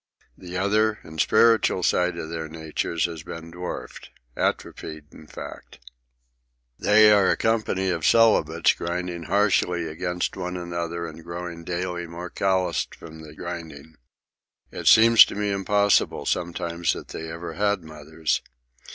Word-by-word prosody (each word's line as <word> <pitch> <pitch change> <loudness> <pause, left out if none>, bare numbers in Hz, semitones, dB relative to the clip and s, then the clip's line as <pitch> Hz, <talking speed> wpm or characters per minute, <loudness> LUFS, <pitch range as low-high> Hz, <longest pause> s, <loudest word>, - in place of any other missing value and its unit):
The 90 0 -7
other 105 +3 +2
and 80 0 -3
spiritual 110 -4 +3
side 90 0 +1
of 80 -1 -6
their 80 -1 -4
natures 80 +1 -2
has 85 -3 -5
been 85 +1 -9
dwarfed—atrophied, 80 -2 -5
in 80 - -14
fact. - - -10 1.0
They 105 +1 +6
are 100 -2 +5
a - - +2
company 110 -4 0
of 85 -3 -3
celibates, 85 -8 +4
grinding 85 -1 -4
harshly 90 -3 +1
against 90 +3 -3
one 90 -1 -4
another 85 -1 -4
and 80 0 -9
growing 85 0 -7
daily 90 0 -3
more 85 +1 -8
calloused 95 -3 0
from 80 -1 -12
the 75 -1 -12
grinding. 80 -3 -8 0.8
It - - -5
seems 115 0 +9
to - - -8
me 105 0 -1
impossible 100 +1 +2
sometimes 85 -1 -1
that - - -9
they 80 0 -6
ever 85 0 -6
had 100 -1 0
mothers. 80 0 -3
85 Hz, 135 wpm, -24 LUFS, 80-95 Hz, 1.0 s, seems